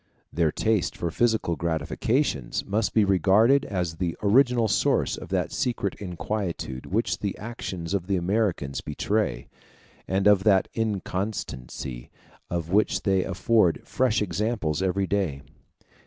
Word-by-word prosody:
Their 85 -3 +2
taste 110 +2 0
for 85 -2 -2
physical 110 -5 +1
gratifications 85 - -1
must 105 +2 -1
be 110 -2 +5
regarded 100 - +4
as 90 -4 -3
the 85 -2 -2
original 120 +2 +4
source 100 - +1
of - - -9
that - - -1
secret 120 -6 -1
inquietude 90 -7 -4
which 110 +5 0
the 100 -2 -3
actions 95 -6 -5
of 95 -3 -1
the 100 - +1
Americans 90 -6 0
betray, 105 +8 -1 0.6
and 95 +1 0
of 105 -2 +5
that 95 -3 +4
inconstancy 95 - -4 0.4
of 85 -1 -3
which 105 +2 +2
they 95 -2 +2
afford 95 -1 +2
fresh 120 -4 +1
examples 100 -6 -1
every 95 +1 +1
day. 90 -9 -1
95 Hz, 130 wpm, -26 LUFS, 85-110 Hz, 0.6 s, be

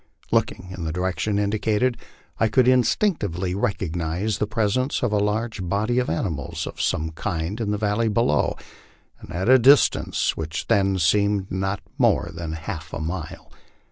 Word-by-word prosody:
Looking 90 - 0
in 85 - -6
the 80 - -2
direction 95 +4 -1
indicated, 110 +4 +1 0.4
I 115 - +4
could 125 +2 +3
indistinctly 120 - +1
recognize 95 +1 -2
the 105 - 0
presence 115 +6 0
of 120 - +1
a 105 - +2
large 105 +1 -1
body 105 +7 0
of 125 - -1
animals 80 -4 -3
of - - -6
some 80 +1 0
kind 85 +4 -3
in 105 - -1
the 105 - 0
valley 105 +2 0
below, 105 -8 +1 0.6
and - - -12
at 95 +4 -2
a 130 +1 +7
distance 135 +4 +4
which 80 0 -4
then 95 -1 +2
seemed 100 +3 +2
not 95 +1 -2 0.2
more - - +2
than 80 -1 -5
half 80 -1 -6
a - - -3
mile. 80 +1 -5
100 Hz, 160 wpm, -23 LUFS, 85-110 Hz, 0.6 s, a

